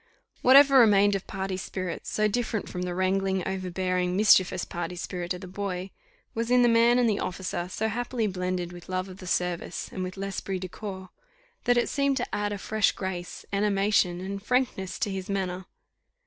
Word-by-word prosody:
Whatever 275 +1 +8
remained 205 -3 +5
of 195 -1 -3
party 190 -1 -3
spirit, 185 -2 -5
so 215 0 +1
different 220 -1 -2
from 180 - -5
the 180 -1 -3
wrangling, 190 0 0
overbearing, 185 -1 -1
mischievous 190 -3 +4
party 175 +1 -5
spirit 175 0 -5
of 180 - -9
the 185 - -8
boy, 190 0 -4 0.4
was 230 +1 -2
in 250 0 +5
the - - +5
man 235 +1 +5
and 245 -1 +3
the 210 -2 +1
officer 180 -1 -3
so 220 +4 -1
happily 240 +1 -2
blended 180 -2 -2
with 175 0 -12
love 185 0 -2
of 185 - -10
the 185 - -10
service, 180 -1 -2
and 185 - -4
with 185 +1 -5
l'esprit 195 0 -3
de 185 0 -5
corps, 190 -1 -7 0.6
that 245 0 +4
it 240 - +2
seemed 280 -1 +1
to 245 - -2
add 205 0 -1
a 205 - -3
fresh 215 +2 +1
grace, 180 -2 -5
animation, 200 -3 +2
and 195 +1 -5
frankness 235 -5 -1
to 205 - -1
his 190 +1 -5
manner. 185 -2 -2
190 Hz, 190 wpm, -27 LUFS, 185-215 Hz, 0.6 s, Whatever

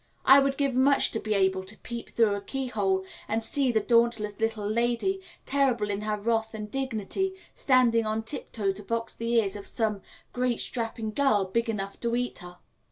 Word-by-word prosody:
I 270 +1 +9
would 275 0 +1
give 275 -2 +1
much 270 +2 +4
to 225 - -2
be 215 -1 -1
able 190 -1 +2
to 195 +3 -13
peep 235 -1 -7
through 225 -3 +3
a 200 - -3
keyhole 205 -6 -1 0.2
and 225 +1 0
see 270 +2 +2
the 220 - +3
dauntless 230 -2 +2
little 220 -2 -1
lady, 240 - 0 0.2
terrible 255 -7 +1
in 200 +1 -2
her 210 0 -1
wrath 220 +1 -1
and 210 -1 -6
dignity, 270 - -2 0.2
standing 240 -4 +3
on 220 +1 -1
tiptoe 220 -5 -2
to 195 +2 -7
box 230 +2 -3
the 230 0 -3
ears 210 -4 +2
of 205 - -7
some 215 -4 -1 0.3
great 250 -1 0
strapping 225 -2 -3
girl 215 -8 +3
big 230 +5 -1
enough 200 -2 -4
to 235 0 -1
eat 245 0 -2
her. 180 -1 -11
225 Hz, 190 wpm, -27 LUFS, 210-245 Hz, 0.3 s, I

